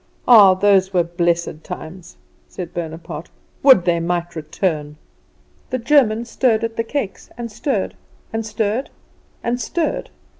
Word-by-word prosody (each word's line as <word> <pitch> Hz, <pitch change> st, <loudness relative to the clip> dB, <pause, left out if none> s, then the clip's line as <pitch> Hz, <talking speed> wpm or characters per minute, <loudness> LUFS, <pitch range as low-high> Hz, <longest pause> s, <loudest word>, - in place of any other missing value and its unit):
Ah, 205 Hz, -6 st, +8 dB
those 195 Hz, -1 st, +3 dB
were 175 Hz, -, +4 dB
blessed 170 Hz, -2 st, -1 dB
times," 170 Hz, +2 st, -9 dB, 0.3 s
said 175 Hz, -2 st, -7 dB
Bonaparte; 165 Hz, -1 st, -6 dB, 0.3 s
"would 265 Hz, -10 st, +6 dB
they 170 Hz, -1 st, +2 dB
might 175 Hz, 0 st, -2 dB
return." 155 Hz, -1 st, -2 dB, 0.7 s
The 255 Hz, -, -1 dB
German 235 Hz, -3 st, +3 dB
stirred 230 Hz, -2 st, +1 dB
at 230 Hz, 0 st, -2 dB
the 230 Hz, -, 0 dB
cakes, 230 Hz, -4 st, -4 dB
and 235 Hz, -1 st, -5 dB
stirred, 270 Hz, +6 st, -2 dB, 0.4 s
and 225 Hz, 0 st, -1 dB
stirred, 220 Hz, +3 st, -2 dB, 0.5 s
and 240 Hz, +1 st, -1 dB
stirred. 320 Hz, +8 st, -2 dB
195 Hz, 135 wpm, -20 LUFS, 170-230 Hz, 0.7 s, Ah